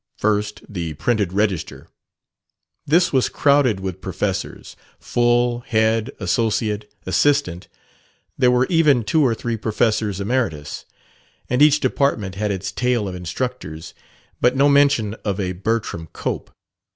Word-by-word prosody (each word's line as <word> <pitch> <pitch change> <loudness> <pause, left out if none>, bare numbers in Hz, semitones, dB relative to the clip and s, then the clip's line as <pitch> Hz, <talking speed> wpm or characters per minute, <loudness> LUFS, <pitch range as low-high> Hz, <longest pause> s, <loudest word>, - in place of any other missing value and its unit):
First, 105 0 -1
the 85 -6 -5
printed 105 +2 0
register. 100 -4 -2 1.0
This 170 +4 +3
was 130 -2 +2
crowded 140 -8 +3
with 95 -1 -5
professors 95 +1 -4 0.2
full, 120 0 +1
head, 110 -1 +1
associate, 110 -2 -1
assistant; 95 -4 +1 0.7
there 125 -2 +3
were 125 +1 +3
even 150 -8 +3
two 155 +8 +2
or 120 -4 +2
three 115 0 -3
professors 110 -2 0
emeritus. 100 - -2 0.7
And 125 +2 +2
each 150 0 +5
department 110 -9 0
had 105 +2 -2
its 100 0 -3
tale 120 -2 0
of 95 - -5
instructors. 90 -2 -5 0.5
But 125 +1 +3
no 140 +1 +5
mention 140 -7 +3
of 100 -1 -2
a 95 -2 -1
Bertram 95 -3 -3
Cope. - - -4
110 Hz, 125 wpm, -21 LUFS, 95-125 Hz, 1.0 s, each